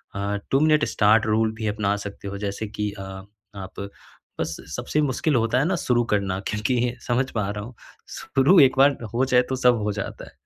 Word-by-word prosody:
अ, 100 +1 -2 0.2
2 135 - +4
minute 155 -1 +4
start 110 +1 +3
rule 110 +1 +2
भी 110 -1 -4
अपना 105 -1 0
सकते 100 0 -8
हो। 100 - -6
जैसे 100 +1 -4
कि 105 0 -3
अ, - - -5 0.5
आप 95 -1 -8 0.6
बस - - -2 0.2
सबसे 150 - -1
मुश्किल 145 +1 0
होता 115 +2 +2
है 145 - +2
ना 185 +2 +1
शुरू 120 -5 +1
करना 95 -2 0
क्योंकि 120 +3 0
समझ 125 +2 +1
पा 105 -3 -2
रहा 105 0 -5
हूँ। 120 +1 -12 0.3
शुरू 140 +8 +3
एक 130 -1 +4
बार 140 +1 +5 0.2
हो 125 +3 +2
जाए 125 -1 +4
तो 130 - 0
सब 125 -1 +4
हो 105 - 0
जाता 100 0 -6
है। - - -15
115 Hz, 205 wpm, -24 LUFS, 105-130 Hz, 0.6 s, बार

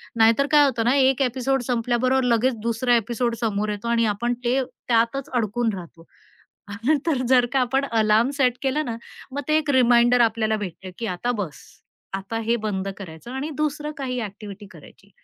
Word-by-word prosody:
नाहीतर 230 +5 +4
काय 295 -1 +7
होतं 235 -5 0
ना? 245 - +4
एक 270 0 +3
ॲपिसोड 265 +1 0
संपल्याबरोबर 250 +2 +1
लगेच 245 +1 +2
दुसरा 235 +2 +1
ॲपिसोड 235 +1 -1
समोर 215 -2 -1
येतो, 210 +2 -4
आणि 230 -1 +2
आपण 240 +4 -1
ते 255 +3 +2 0.3
त्यातच 235 +3 +1
अडकून 230 -1 0
राहतो. 170 -2 -10 0.7
आपण 255 +9 +1
तर 295 -6 +1
जर 250 -1 +5
का 270 - +2
आपण 265 +3 +1
अलार्म 220 +2 +3
सेट 255 -3 +2
केलं 285 +3 0
ना, 230 -3 -4 0.4
मग 285 - -2
ते 305 - +3
एक 300 -2 -2
रिमाइंडर 245 -1 +4
आपल्याला 220 -1 +2
भेटते, 190 -2 -7
की 230 - -3
आता 185 +5 -2
बस. 160 -8 -6 0.5
आता 195 +4 -4
हे 230 +2 +1
बंद 195 -2 -2
करायचं, 170 +3 -10
आणि 270 +4 -4
दुसरं 300 0 -2
काही 250 -2 -3
ॲक्टिव्हिटी 205 -1 -8
करायची. 185 +5 -17
235 Hz, 175 wpm, -23 LUFS, 215-260 Hz, 0.7 s, काय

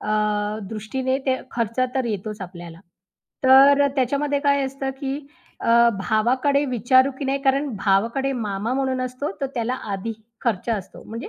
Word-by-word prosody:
अ, - - -6 0.6
दृष्टीने 260 +5 -2
ते 260 - +2 0.2
खर्च 230 0 -2 0.2
तर 260 -2 0
येतोच 210 0 -4
आपल्याला, 175 -2 -9 0.6
तर 275 +2 +7
त्याच्यामध्ये 280 +3 +1
काय 280 -1 +2
असतं, 270 0 -3
की 275 -1 -2 0.4
अ, 235 +1 +5
भावाकडे 255 +8 +2
विचारू 255 +2 +3
की 285 - -4
नाही 270 +1 0
कारण 275 +1 +2
भावाकडे 230 +8 +1
मामा 215 -1 -2
म्हणून 265 -1 0
असतो, 255 +3 -3
तर 275 - 0
त्याला 240 +1 -1 0.2
आधी 195 +4 -3 0.3
खर्च 230 -2 -1
असतो 195 -4 -4
म्हणजे 230 +3 -7
255 Hz, 150 wpm, -23 LUFS, 220-270 Hz, 0.6 s, तर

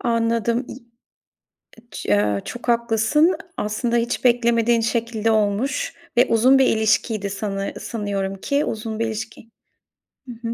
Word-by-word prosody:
Anladım. 230 +1 0
İ 255 - -8 1.1
ç - - -7
eee, 105 -1 +1
çok 245 +1 -8
haklısın. 235 +8 +2 0.2
Aslında 230 +3 -1
hiç 235 +2 -1
beklemediğin 235 -1 +3
şekilde 225 -1 0
olmuş 220 - 0 0.2
ve 245 - +6
uzun 255 +4 +5
bir 265 - +5
ilişkiydi 215 -1 +1
sanı 195 0 -4
sanıyorum 200 -3 -3
ki 280 +9 -1
uzun 220 0 -4
bir 230 - +1
ilişki 220 +1 -7 0.8
Hı - - -7 0.2
hı. - - -2
230 Hz, 130 wpm, -22 LUFS, 210-240 Hz, 1.1 s, ve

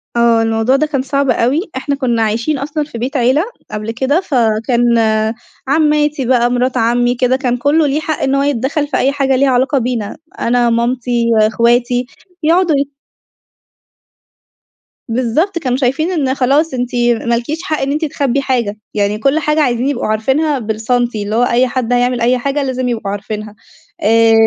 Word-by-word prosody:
آه. 235 -1 +4
الموضوع 225 +3 +1
ده 290 +3 +2
كان 280 -4 -1
صعب 275 0 -1
أوي. 260 +7 +2 0.2
إحنا 280 +2 -2
كُنّا 245 -4 0
عايشين 230 +7 0
أصلًا 290 +3 -3
في 290 -5 -9
بيت 260 +5 -2
عيلة 260 +5 +2 0.3
قبل 215 +1 -4
كده، 265 +8 0
فكان 235 - 0 0.9
عمّاتي 300 -1 +1
بقى، 240 -1 +2
مِرات 250 +1 0
عمّي 245 +2 +2
كده 250 +1 +1
كان 250 -3 -1
كُلّه 290 +4 +2
ليه 285 +2 0
حق 310 0 -3
إن 270 0 +1
هوَ 275 - +1
يتدخّل 285 +2 -1
في 295 - -1
أي 270 - +2
حاجة 275 -2 +1
ليها 275 +1 +2
علاقة 260 +3 +2
بينا. 235 -4 -2 0.2
أنا، 240 0 +2
مامتي، 235 0 0
أخواتي، 240 +3 +2 0.4
يقعدوا 335 0 +3
ي 280 0 0 2.2
بالضبط. 255 - 0
كانوا 255 -5 -1
شايفين 275 +6 0
إن 275 -7 0
خلاص 280 +4 +1
أنتِ 245 -1 -3 0.3
ما 235 0 +2
لكيش 295 +9 -4
حق 310 -6 -2
إن 270 +1 -1
أنتِ 305 +3 -1
تخبّي 280 -2 -1
حاجة. 240 -6 -1 0.2
يعني 205 0 0
كل 275 +8 +1
حاجة 300 0 +1
عايزين 250 -2 +1
يبقوا 285 - -2
عارفينها 265 +7 0
بالسنتي. 225 0 -1
اللي 210 +2 -3
هو 240 - +3
أي 245 +1 +2
حد 250 -1 -2
هيعمل 245 0 +1
أي 245 +2 +3
حاجة 280 +3 -1
لازم 255 -1 -2
يبقوا 220 -4 -3
عارفينها. 210 +1 -6 0.5
آآ 225 +1 +4
255 Hz, 170 wpm, -15 LUFS, 235-280 Hz, 2.2 s, آه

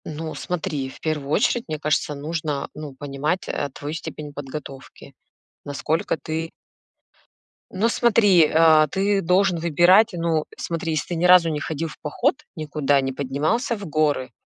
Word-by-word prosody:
Ну, 155 +1 -5
смотри, 160 -6 -3
в - - -14
первую 150 -3 -3
очередь, 230 +8 +1
мне 155 -2 -4
кажется, 150 -1 0
нужно, 150 -1 -3
ну, 150 -3 -8
понимать, 145 +6 -3
э, 145 - -2
твою 145 +1 -6
степень 150 -1 -7
подготовки, 140 -1 -9 0.5
насколько 150 +3 -2
ты 160 +3 -4 1.2
Ну, 215 +4 +1
смотри, 205 -8 +4
а, 160 -1 +6
ты 195 +5 0
должен 180 +1 +2
выбирать 175 +6 +5
Ну, 165 -3 0
смотри, 165 -1 -3
если 155 - -2
ты 175 - -2
ни 165 - -2
разу 180 -2 +7
не 150 -2 -2
ходил 160 +2 -3
в - - -11
поход 240 - 0 0.2
никуда, 150 -3 0
не 135 0 -2
поднимался 150 - -1
в 200 - -8
горы, 150 -4 0
155 Hz, 155 wpm, -23 LUFS, 145-175 Hz, 1.2 s, разу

